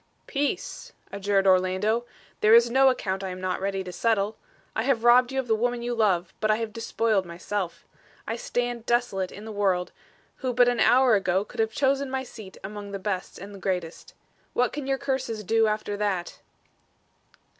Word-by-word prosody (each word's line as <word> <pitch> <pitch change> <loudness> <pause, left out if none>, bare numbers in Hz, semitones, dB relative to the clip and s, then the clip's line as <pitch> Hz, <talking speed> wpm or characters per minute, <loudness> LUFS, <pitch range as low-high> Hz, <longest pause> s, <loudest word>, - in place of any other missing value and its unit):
"Peace!" 285 +1 -3 0.2
adjured 200 0 +1
Orlando. 190 +5 +2 0.3
"There 215 +2 +6
is 235 0 +5
no 265 +1 +6
account 195 -6 -2
I 190 - -3
am 185 0 -6
not 185 0 -2
ready 195 0 -1
to 180 - -7
settle. 215 -1 +1 0.4
I - - +1
have 240 -2 +1
robbed 245 +1 +6
you 265 - -1
of 265 - -1
the 225 - +3
woman 240 +2 0
you 240 0 -1
love, 190 -7 +1
but 215 - 0
I 215 - +5
have 225 -1 -4
despoiled 225 -3 0
myself. 180 +1 -5 0.4
I - - -2
stand 245 - -3
desolate 235 -6 0
in 205 - -10
the 220 - -6
world, 190 -4 0 0.5
who 255 -3 -3
but 245 0 +5
an 245 -1 +1
hour 255 -1 +5
ago 190 -1 +2
could 245 - -12
have 220 0 +2
chosen 275 +2 +1
my 265 0 -2
seat 215 -6 -11
among 205 +1 -7
the - - -2
best 190 -1 -4
and 200 0 -10
greatest. 180 -3 -4 0.4
What 245 -1 +1
can 290 -2 -5
your 270 0 +1
curses 260 -5 -2
do 225 +3 +3
after 215 -1 -2
that?" 200 -4 -2
215 Hz, 190 wpm, -26 LUFS, 195-245 Hz, 0.5 s, There